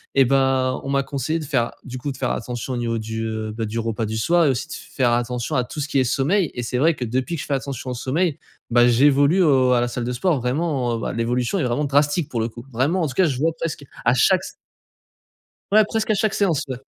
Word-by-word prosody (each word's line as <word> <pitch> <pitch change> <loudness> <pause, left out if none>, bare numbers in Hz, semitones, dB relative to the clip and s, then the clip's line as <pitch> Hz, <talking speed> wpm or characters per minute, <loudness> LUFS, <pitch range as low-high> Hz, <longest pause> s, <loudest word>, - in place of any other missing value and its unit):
Eh 135 -1 +6
bah, 130 -1 +2
on 135 - -5
m'a 140 0 +2
conseillé, 145 +4 -2
de 155 - -6
faire, 130 -4 0
du 130 0 -6
coup, 140 +3 -3
de 130 - -9
faire 130 - -1
attention 125 +2 -4
au - - -2
niveau 115 -1 -1
du, 110 +1 -4
heu, 110 -1 -4
bah, 115 0 -4
du 110 +2 -3
repas 115 0 -2
du 110 +1 -3
soir 170 +9 +3
et 145 - +4
aussi 125 - -1
de - - -6
f - - -9
faire 120 -3 +2
attention 120 0 -1
à 125 - +2
tout 140 - -8
ce 140 - -2
qui 145 - -1
est - - +4
sommeil. 145 - +1
Et 125 - -3
c'est 125 +2 -2
vrai 160 +5 +4
que, 125 - -4
depuis 130 +8 -2
que - - -4
je - - -10
fais 145 - -1
attention 130 -1 -5
au - - -2
sommeil, 150 +6 0 0.3
bah 120 0 +5
j'évolue 140 +7 +4
au 130 -5 +4
à 125 - +3
la 120 - +1
salle 120 0 -4
de 125 - -2
sport, 150 +4 +1
vraiment, 130 -2 -1
heu, - - -5
bah, - - -3
l'évolution 120 +7 0
est 155 - 0
vraiment 125 +4 0
drastique, 145 +3 +2
pour 115 - -2
le 115 - -1
coup. 120 +2 -11
Vraiment, 150 +10 +1
en - - +1
tout 130 - -6
cas, 190 - +4
je 135 -6 -1
vois 160 +3 +1
presque 155 -3 -4 0.2
à 120 - +5
chaque 185 +7 +4
s - - -8 1.2
Ouais, 215 +1 +6
presque 220 0 -1
à - - +4
chaque 215 0 +1
séance, 180 -8 +1
ouais. 130 -2 -4
130 Hz, 275 wpm, -22 LUFS, 120-150 Hz, 1.2 s, Eh